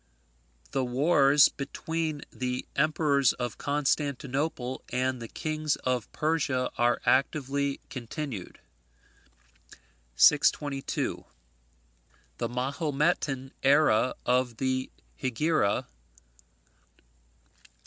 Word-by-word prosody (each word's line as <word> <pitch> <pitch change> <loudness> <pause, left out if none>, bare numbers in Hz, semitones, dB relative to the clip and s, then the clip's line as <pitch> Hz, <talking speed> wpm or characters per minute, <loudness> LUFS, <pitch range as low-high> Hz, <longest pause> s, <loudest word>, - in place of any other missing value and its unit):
The 135 - 0
wars 140 +2 +5
between 155 +2 -4
the 125 0 -3
Emperors 145 -3 +3
of 125 -1 -5
Constantinople 140 -2 -1
and 130 0 -1
the 115 - -6
Kings 155 +3 -2
of 125 -5 -2
Persia 145 -5 0
are 120 0 +2
actively 140 0 +1
continued. 125 - -6 1.6
622. 140 - +2 1.1
The 120 - -1
Mahometan 135 +1 -1
era 135 -4 +4
of 125 -2 +1
the 130 0 -1 0.3
Hegira. 130 -3 +1
135 Hz, 75 wpm, -28 LUFS, 125-150 Hz, 1.6 s, wars